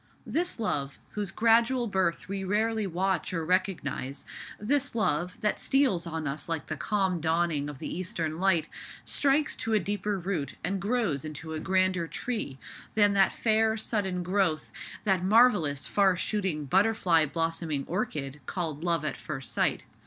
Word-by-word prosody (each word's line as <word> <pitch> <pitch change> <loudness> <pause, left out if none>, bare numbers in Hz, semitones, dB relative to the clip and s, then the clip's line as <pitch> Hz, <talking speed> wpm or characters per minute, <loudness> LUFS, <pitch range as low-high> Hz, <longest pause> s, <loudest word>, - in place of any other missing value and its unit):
This 350 -5 -1
love, 140 -11 -2
whose 210 -3 -3
gradual 235 +5 +3
birth 190 -5 0
we 195 0 -3
rarely 215 +2 0
watch 185 0 -1
or 165 -1 -2
recognize—this 185 - -2
love, 180 -2 0
that 210 -1 0
steals 235 -12 +2
on 160 -1 -3
us 140 +3 -4
like 160 -4 -2
the 155 - -4
calm 190 0 0
dawning 160 -2 +1
of 145 - -8
the - - -5
eastern 165 -3 -3
light, 180 -5 +3 0.4
strikes 285 +1 +2
to 225 - -2
a 215 - +5
deeper 205 +2 -2
root 175 -6 -3
and 190 +2 -1
grows 200 - 0
into 155 +1 -6
a 155 - -3
grander 185 -1 +1
tree 210 - -4 0.4
than 205 -1 +5
that 195 -1 +4
fair 220 0 +2
sudden 195 -5 -1
growth, 180 -4 0 0.3
that 190 -4 +2
marvellous 190 - +4
far 195 -3 +3
shooting 185 -8 -1
butterfly 185 -1 +3
blossoming 165 -2 -1
orchid, 150 - -3
called 160 -4 -3
love 170 -3 +1
at 150 - -1
first 135 -4 -5
sight. - - +1
185 Hz, 155 wpm, -28 LUFS, 160-210 Hz, 0.4 s, a